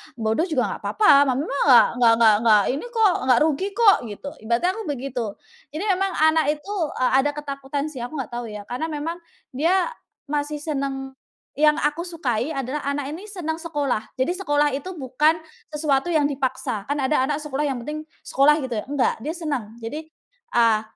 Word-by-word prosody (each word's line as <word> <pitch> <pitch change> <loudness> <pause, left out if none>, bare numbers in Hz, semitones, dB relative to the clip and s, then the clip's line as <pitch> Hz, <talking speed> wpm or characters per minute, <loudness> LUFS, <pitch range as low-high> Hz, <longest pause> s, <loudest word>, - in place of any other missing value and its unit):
bodoh 225 +9 0
juga 305 -8 +1
nggak - - -5
papa, 285 -9 +5
mama 260 +2 0
nggak 275 -4 +5 0.3
nggak 225 -2 +5
nggak 215 -3 +6
ini 280 - -4
kok, 445 -5 +3 0.2
nggak 245 -2 +6
rugi 320 +5 0
kok," 450 -4 +6
gitu. 210 +7 -7
Ibaratnya 235 +10 +1
aku 445 +2 -6
begitu, 260 -3 -3 0.5
jadi 325 - -3
memang 385 +1 0
anak 315 0 +4
itu, 395 +8 -8 0.2
eee, 255 - +2
ada 290 - 0
ketakutan 280 -1 -4
sih 265 - -8
aku 245 +6 -6
nggak 255 -3 -5
tahu 240 0 -4
ya 210 -1 -7
karena 250 +9 -3
memang 315 +3 -4 0.4
dia 355 - +1 0.3
masih 295 +1 -2
seneng 275 -3 -4 0.5
yang 300 0 +5
aku 300 +3 0
sukai 270 -7 -2
adalah 270 +2 -3
anak 280 0 -3
ini 375 +7 -8
seneng 330 -5 -4
sekolah, 290 -9 -2
jadi 260 +6 +1
sekolah 290 -5 +2
itu 320 +7 -5
bukan 300 +4 +2 0.3
sesuatu 300 -2 0
yang 310 -4 +2
dipaksa, 255 -5 -3
kan 285 - 0
ada 265 +1 +2
anak 295 - 0
sekolah 295 0 -2
yang 265 - -2
penting 305 +1 -4 0.2
sekolah 280 +3 +4
gitu 235 -5 -3
ya, - - -13
nggak, 280 -5 +1
dia 305 +6 -3
seneng 280 -10 -4
jadi, 230 +7 -4 0.6
eee, 230 -2 +4
285 Hz, 180 wpm, -23 LUFS, 255-315 Hz, 0.6 s, nggak